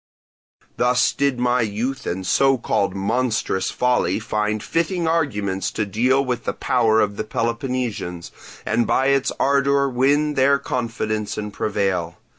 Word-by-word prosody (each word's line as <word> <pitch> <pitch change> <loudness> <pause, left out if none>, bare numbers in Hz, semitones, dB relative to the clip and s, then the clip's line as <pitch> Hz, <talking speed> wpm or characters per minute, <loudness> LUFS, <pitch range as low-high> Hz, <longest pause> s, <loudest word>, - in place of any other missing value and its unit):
"Thus 125 +1 +2
did 140 -2 0
my 125 0 +2
youth 115 +6 -3
and 95 +2 -3
so 135 +7 +3
called 100 -4 -1
monstrous 100 -2 -1
folly 125 -7 +1
find 105 -1 -2
fitting 170 +1 -1
arguments 105 - 0
to 110 - -1
deal 125 +7 +1
with 125 -2 -3
the - - -1
power 115 -3 +2
of 105 -1 0
the - - -2
Peloponnesians, 115 -6 -3 0.3
and 115 +2 +1
by 130 +1 +2
its 140 -1 +2
ardour 140 0 +2
win 140 +4 +2
their 140 +1 +3
confidence 115 -5 -3
and 105 -1 -5
prevail. 95 -5 -1
120 Hz, 140 wpm, -21 LUFS, 105-135 Hz, 0.3 s, so